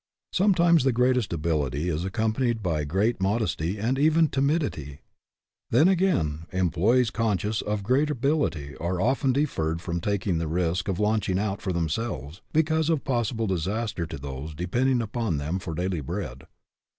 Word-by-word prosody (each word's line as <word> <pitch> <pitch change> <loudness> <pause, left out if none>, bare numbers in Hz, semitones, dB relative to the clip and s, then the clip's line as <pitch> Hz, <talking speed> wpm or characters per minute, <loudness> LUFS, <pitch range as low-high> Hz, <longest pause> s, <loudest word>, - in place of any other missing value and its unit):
Sometimes 175 -5 +4
the 135 - +3
greatest 125 -1 +2
ability 75 -2 -1
is 85 -1 -1
accompanied 110 +4 0
by 80 -5 0
great 95 +8 0
mod 105 +4 +1
esty 90 -1 -2
and 120 +6 0
even 160 +1 +4
timidity. 135 - -1 0.7
Then, 140 +9 +5
again, 155 - +1
em 95 -2 +1
ployees 115 +7 +2
conscious 105 -1 0
of 105 -1 -2
great 135 +7 +2
ability 120 - -1
are 85 +2 -2
often 130 +5 +2
de 140 +4 +2
terred 80 - -2
from 85 0 -3
taking 95 -3 0
the 80 - -2
risk 90 +2 -1
of 95 -3 -1
launching 105 -3 +1
out 100 0 -2
for 95 - -2
themselves 85 - -3
because 160 0 +2
of 160 -4 +1
possible 120 -3 -1
disaster 95 0 -2
to - - -6
those 70 +2 -7
depending 120 - +1
upon 110 -6 -2
them 80 +6 -2
for 85 -3 -5
daily 90 -1 -1
bread. 65 -1 -5
100 Hz, 160 wpm, -26 LUFS, 85-125 Hz, 0.7 s, Then